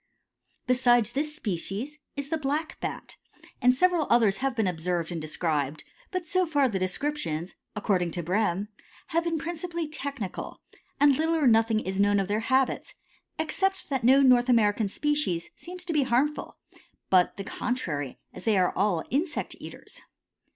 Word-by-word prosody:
Besides 245 -3 +3
this 300 +4 -2
species 215 - -3 0.2
is 280 0 -4
the 320 - 0
Black 300 +3 -2
Bat, - - -6 0.4
and 250 +1 +5
several 350 0 +2
others 220 -4 +4
have 270 -2 -1
been 220 -3 +1
observed 175 -1 -1
and 165 -2 -3
described, 155 -2 -2 0.3
but 370 -2 -3
so 365 +2 +1
far 290 -4 +3
the 200 -6 -2
descriptions, 185 - -2 0.2
according 190 -4 +1
to 175 - -3
Brehm, 200 +2 0 0.4
have 335 +1 +1
been 330 -1 0
principally 340 +1 -3
technical, 280 - -5 0.4
and 285 -1 +6
little 320 +1 +1
or 310 -3 +1
nothing 225 -2 +4
is 190 -1 -3
known 205 0 +4
of 195 - -1
their 205 +1 0
habits, 260 0 +1 0.4
except 385 +3 -1
that 265 -3 0
no 265 +3 +6
North 250 -1 +5
American 215 -3 +3
species 295 - -1
seems 360 +1 -7
to 340 - -2
be 300 - +3
harmful, 265 +4 0 0.5
but 185 -2 +4
the 195 - -4
contrary, 170 - -3 0.2
as - - -10
they 220 -3 +2
are 180 -1 +2
all 190 -4 +1
insect 300 +5 -1
eaters. - - -10
245 Hz, 160 wpm, -27 LUFS, 190-300 Hz, 0.5 s, and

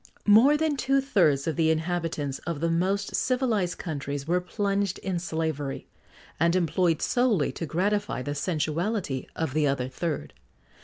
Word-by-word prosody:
More 235 +8 +6
than 310 -2 0
two 275 +1 +2
thirds 170 - +2
of 160 - -1
the 160 -1 +2
inhabitants 160 -4 -1
of 165 -4 -2
the 165 +1 0
most 195 +4 0
civilised 240 -8 0
countries 145 -3 -4
were 180 +2 +2
plunged 200 0 -1
in 185 -2 -3
slavery, 160 -5 -3 0.5
and 170 +2 +3
employed 170 -1 +1
solely 240 - +2
to 165 - -5
gratify 200 -2 -1
the 145 - -3
sensuality 160 - -2
of 160 -5 -2
the 155 -1 +2
other 135 -2 0
third. 130 - -4
170 Hz, 150 wpm, -27 LUFS, 150-200 Hz, 0.5 s, More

